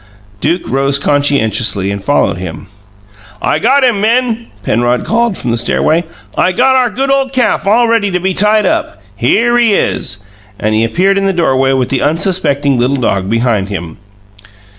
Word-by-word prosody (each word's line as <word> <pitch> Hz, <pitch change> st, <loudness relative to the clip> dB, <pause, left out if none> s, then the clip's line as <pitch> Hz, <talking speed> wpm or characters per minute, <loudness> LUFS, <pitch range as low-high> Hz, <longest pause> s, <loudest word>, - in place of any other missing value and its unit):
Duke 170 Hz, -, -1 dB
rose 135 Hz, +3 st, +1 dB
conscientiously 120 Hz, -9 st, 0 dB
and 100 Hz, -1 st, -5 dB
followed 145 Hz, -6 st, +1 dB
him. 90 Hz, 0 st, -7 dB, 0.7 s
"I -, -, 0 dB
got 275 Hz, +1 st, +3 dB
him, 235 Hz, -6 st, +2 dB
men!" 235 Hz, +1 st, 0 dB, 0.2 s
Penrod 120 Hz, +4 st, 0 dB
called 230 Hz, -2 st, 0 dB
from 120 Hz, -, -3 dB
the 115 Hz, -, 0 dB
stairway. 160 Hz, +8 st, 0 dB, 0.3 s
"I 185 Hz, -, +1 dB
got 260 Hz, +5 st, +3 dB
our 255 Hz, -2 st, +2 dB
good 270 Hz, +5 st, -2 dB
ole 270 Hz, -1 st, +1 dB
calf 255 Hz, -6 st, 0 dB
all 235 Hz, +4 st, +3 dB
ready 225 Hz, -3 st, +1 dB
to 180 Hz, -1 st, -1 dB
be 190 Hz, +1 st, -1 dB
tied 210 Hz, +2 st, +2 dB
up. -, -, -1 dB, 0.2 s
Here 225 Hz, -, +1 dB
he 225 Hz, -4 st, +3 dB
is!" 105 Hz, -, -2 dB, 0.3 s
And 110 Hz, 0 st, -1 dB
he 110 Hz, +1 st, +2 dB
appeared 190 Hz, +11 st, +1 dB
in 195 Hz, -, 0 dB
the 195 Hz, -, +1 dB
doorway 135 Hz, -6 st, +1 dB
with 130 Hz, -2 st, 0 dB
the 135 Hz, -, -1 dB
unsuspecting 145 Hz, -4 st, 0 dB
little 130 Hz, +3 st, +1 dB
dog 100 Hz, -6 st, -1 dB
beside 115 Hz, -4 st, 0 dB
him. 85 Hz, -5 st, -6 dB
150 Hz, 175 wpm, -12 LUFS, -, 0.7 s, got